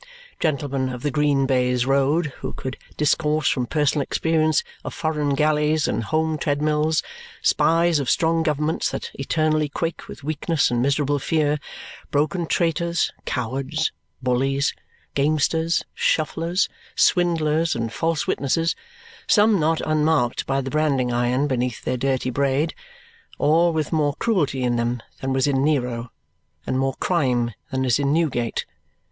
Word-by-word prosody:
Gentlemen 140 Hz, -4 st, -1 dB
of 125 Hz, -1 st, -6 dB
the 145 Hz, -, 0 dB
green 140 Hz, -1 st, +2 dB
baize 125 Hz, -2 st, +1 dB
road 140 Hz, +3 st, +1 dB
who -, -, -5 dB
could 130 Hz, 0 st, -5 dB, 0.2 s
discourse 150 Hz, 0 st, +1 dB
from 125 Hz, -3 st, +1 dB
personal 150 Hz, 0 st, +1 dB
experience 155 Hz, +2 st, +1 dB, 0.2 s
of -, -, -6 dB
foreign 150 Hz, -3 st, 0 dB
galleys 150 Hz, +1 st, +2 dB
and -, -, -1 dB
home 160 Hz, +1 st, 0 dB
treadmills; 150 Hz, +1 st, +1 dB, 0.4 s
spies 165 Hz, -1 st, +3 dB
of 135 Hz, -, -2 dB
strong 165 Hz, 0 st, +2 dB
governments 155 Hz, 0 st, 0 dB
that -, -, -5 dB
eternally 155 Hz, +1 st, 0 dB
quake 165 Hz, +3 st, -4 dB
with -, -, -10 dB
weakness 155 Hz, 0 st, 0 dB
and 120 Hz, 0 st, +1 dB
miserable 140 Hz, +2 st, +1 dB
fear, 150 Hz, 0 st, +1 dB, 0.5 s
broken 160 Hz, +4 st, 0 dB
traitors, 170 Hz, 0 st, 0 dB
cowards, 135 Hz, +5 st, -2 dB, 0.3 s
bullies, 135 Hz, +2 st, +1 dB, 0.4 s
gamesters, 155 Hz, +3 st, +1 dB
shufflers, 165 Hz, +4 st, 0 dB, 0.3 s
swindlers, 165 Hz, -2 st, +2 dB
and 115 Hz, -1 st, -3 dB
false 165 Hz, -1 st, 0 dB
witnesses; 165 Hz, +4 st, 0 dB, 0.5 s
some 210 Hz, -2 st, +4 dB
not 160 Hz, +1 st, +1 dB
unmarked 155 Hz, -5 st, +1 dB
by 135 Hz, 0 st, +1 dB
the 135 Hz, 0 st, -5 dB
branding 140 Hz, -5 st, +1 dB
iron 120 Hz, +3 st, +1 dB
beneath 125 Hz, -4 st, -2 dB
their 125 Hz, -, -1 dB
dirty 130 Hz, 0 st, 0 dB
braid; 140 Hz, +4 st, 0 dB, 0.6 s
all 165 Hz, +3 st, +3 dB
with 155 Hz, -2 st, -2 dB
more 145 Hz, -3 st, +1 dB
cruelty 150 Hz, -, 0 dB
in 120 Hz, -1 st, +1 dB
them 120 Hz, +1 st, -1 dB, 0.2 s
than 135 Hz, -, -2 dB
was 130 Hz, 0 st, +2 dB
in 135 Hz, -2 st, +1 dB
Nero, 125 Hz, -6 st, -1 dB, 0.5 s
and 130 Hz, -, -1 dB
more 135 Hz, 0 st, 0 dB
crime 125 Hz, -9 st, 0 dB, 0.2 s
than 130 Hz, 0 st, -1 dB
is 125 Hz, +1 st, +2 dB
in 140 Hz, -1 st, +1 dB
Newgate. 145 Hz, -8 st, 0 dB
145 Hz, 140 wpm, -23 LUFS, 130-160 Hz, 0.6 s, some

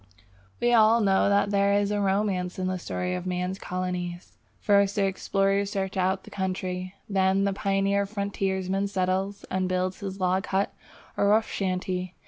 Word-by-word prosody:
We 240 Hz, 0 st, +2 dB
all 225 Hz, 0 st, +6 dB
know 195 Hz, -2 st, +3 dB
that 200 Hz, 0 st, +2 dB
there 200 Hz, 0 st, +3 dB
is 205 Hz, 0 st, +1 dB
a 205 Hz, 0 st, 0 dB
romance 190 Hz, -2 st, 0 dB
in 185 Hz, -, -2 dB
the 185 Hz, 0 st, -1 dB
story 180 Hz, +1 st, -3 dB
of 180 Hz, 0 st, -4 dB
man's 180 Hz, +1 st, -2 dB
colonies. 180 Hz, -1 st, -4 dB, 0.2 s
First 200 Hz, -1 st, +3 dB
the 200 Hz, -, +2 dB
explorer 195 Hz, +1 st, +1 dB
searches 195 Hz, -1 st, -3 dB
out 190 Hz, 0 st, 0 dB
the -, -, -13 dB
country; 185 Hz, -1 st, -3 dB
then 190 Hz, -1 st, +2 dB
the 200 Hz, 0 st, +1 dB
pioneer 195 Hz, +1 st, +1 dB
frontiersman 195 Hz, -1 st, -1 dB
settles 195 Hz, +1 st, -1 dB
and 185 Hz, 0 st, 0 dB
builds 185 Hz, 0 st, -1 dB
his 195 Hz, -1 st, -6 dB
log 185 Hz, +1 st, +1 dB
hut 195 Hz, +1 st, 0 dB, 0.4 s
or 200 Hz, -, +3 dB
rough 215 Hz, +2 st, +3 dB
shanty. 185 Hz, -1 st, -2 dB
195 Hz, 165 wpm, -26 LUFS, 185-200 Hz, 0.4 s, all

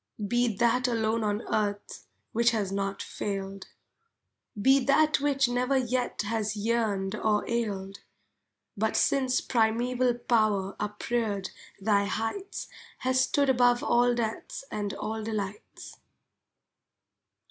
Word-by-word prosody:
Be 240 Hz, +2 st, +2 dB
that 240 Hz, +2 st, +2 dB
alone 225 Hz, -1 st, 0 dB
on 210 Hz, +1 st, -1 dB
earth 205 Hz, -1 st, -3 dB, 0.2 s
which 235 Hz, +1 st, +3 dB
has 210 Hz, -5 st, -1 dB
not 195 Hz, 0 st, -2 dB
failed. 195 Hz, -1 st, -5 dB, 0.9 s
Be 265 Hz, +5 st, +4 dB
that 305 Hz, +3 st, +3 dB
which 275 Hz, -2 st, +2 dB
never 250 Hz, +2 st, +1 dB
yet 250 Hz, -3 st, -1 dB
has 215 Hz, 0 st, -2 dB
yearned 210 Hz, -3 st, 0 dB
or 215 Hz, -1 st, 0 dB
ailed, 200 Hz, -4 st, -2 dB, 0.8 s
But 220 Hz, +2 st, 0 dB
since 260 Hz, -2 st, +2 dB
primeval 245 Hz, +2 st, +1 dB
Power 215 Hz, -5 st, +1 dB
upreared 210 Hz, -1 st, -2 dB, 0.3 s
thy 200 Hz, 0 st, +2 dB
heights 225 Hz, -, -3 dB, 0.3 s
Has 260 Hz, 0 st, +2 dB
stood 280 Hz, +2 st, +2 dB
above 245 Hz, -2 st, +3 dB
all 245 Hz, 0 st, +3 dB
deaths 225 Hz, +2 st, -3 dB
and 205 Hz, -1 st, -2 dB
all 220 Hz, 0 st, -4 dB
delights. 210 Hz, -2 st, -6 dB
225 Hz, 115 wpm, -28 LUFS, 205-245 Hz, 0.9 s, Be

